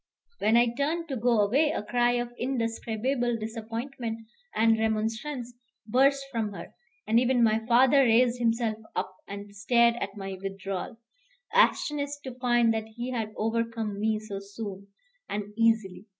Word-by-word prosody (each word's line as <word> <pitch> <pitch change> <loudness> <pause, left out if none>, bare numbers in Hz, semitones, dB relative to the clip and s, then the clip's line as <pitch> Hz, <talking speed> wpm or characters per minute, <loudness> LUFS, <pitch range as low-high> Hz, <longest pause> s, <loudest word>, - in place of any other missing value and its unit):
When 220 +2 +4
I 235 0 +3
turned 320 +5 -1
to 270 - -2
go 235 -2 +3
away, 270 +10 +3
a 295 - -2
cry 240 +2 +2
of 240 0 -2
indescribable 240 0 -1
disappointment 225 +1 -5 0.3
and 225 0 +4
remonstrance 225 +4 -2 0.3
burst 275 +5 +3
from 220 -4 -2
her, - - -9 0.3
and 225 +2 +4
even 250 -1 +3
my 220 0 +3
father 255 +3 +5
raised 245 -1 +4
himself 230 -2 0 0.2
up 185 - -3
and 200 0 -8
stared 235 +3 +4
at 200 -3 -5
my 195 -1 -6
withdrawal, 195 +2 -5 0.6
astonished 290 - +2
to 260 - -6
find 240 -2 +3
that 220 0 -3
he 240 +3 -6
had 225 -3 -2
overcome 225 -2 -2
me 215 0 +1
so 215 -2 -6
soon 200 -1 -8 0.4
and 205 0 -4
easily. 225 -3 +1
230 Hz, 150 wpm, -28 LUFS, 215-245 Hz, 0.6 s, father